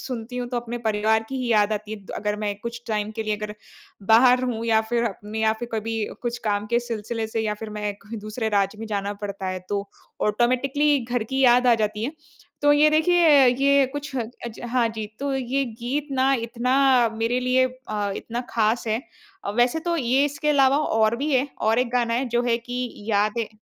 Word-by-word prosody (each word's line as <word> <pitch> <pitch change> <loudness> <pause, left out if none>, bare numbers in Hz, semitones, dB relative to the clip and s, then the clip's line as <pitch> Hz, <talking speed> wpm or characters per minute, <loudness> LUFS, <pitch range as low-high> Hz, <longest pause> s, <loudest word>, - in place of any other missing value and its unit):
सुनती 250 -1 -6
हूँ 245 -1 -3
तो 245 - -3
अपने 240 0 -4
परिवार 220 +1 +2
की 270 - -4
ही 245 - -2
याद 210 0 +3
आती 215 +1 -4
है - - -4
द - - -11
अगर 210 0 -2
मैं 210 -1 -2
कुछ 235 0 -5
टाइम 215 -1 -1
के 220 - -1
लिए 215 -1 -1
अगर, 210 0 -6 0.5
बाहर 245 +4 +6
रहूँ 235 -3 -2
या 220 -1 +4
फिर 235 0 +1
अ, 210 -5 -1
में 215 +1 -5
या 220 0 +3
फिर 235 +2 -6
कभी 225 0 -2 0.2
कुछ 240 0 -2
काम 205 0 0
के 235 +2 +2
सिलसिले 225 -1 -4
से 220 0 -2
या 210 -1 -1
फिर 215 - -5
मैं 205 -1 -2
कोई 220 +3 -8
दूसरे 220 +1 -2
राज्य 200 +2 0
में 225 - -6
जाना 205 -1 -2
पड़ता 200 -1 -5
है 185 0 -2
तो, 200 -1 -2 0.3
ऑटोमैटिकली 255 +6 +2
घर 240 -2 -2
की 265 - +1
याद 250 +1 +5
आ 240 - +6
जाती 210 +1 -3
है। 285 - -3 0.5
तो 290 0 +6
ये 300 +1 +5
देखिए 315 -3 +5
ये 275 +2 +4
कुछ 290 -1 -6
ह - - 0 0.3
अज 230 - -8
हाँ, 245 -2 +2
जी, 220 -1 -5
तो 280 0 -2
ये 265 +1 0
गीत 250 +5 -4
ना 265 +1 +3
इतना 250 +1 +2
मेरे 230 +3 0
लिए 255 +1 +3 0.2
अ, 210 -1 -1
इतना 235 +1 -4
ख़ास 225 +1 +1
है। 220 +1 0 0.4
अ, - - -2
वैसे 240 +7 +2
तो 340 - +1
ये 265 -1 +2
इसके 290 +1 -2
अलावा 275 -1 +4
और 225 -6 +2
भी 290 +3 -2
हैं, 265 +3 +2
और 220 +2 +2
एक 250 -1 +1
गाना 240 -2 +1
है 250 +3 0
जो 240 +1 +1
है 230 - +3
कि 245 +1 -4 0.2
याद 210 +2 +1
है 225 - -1
235 Hz, 225 wpm, -24 LUFS, 215-255 Hz, 0.5 s, बाहर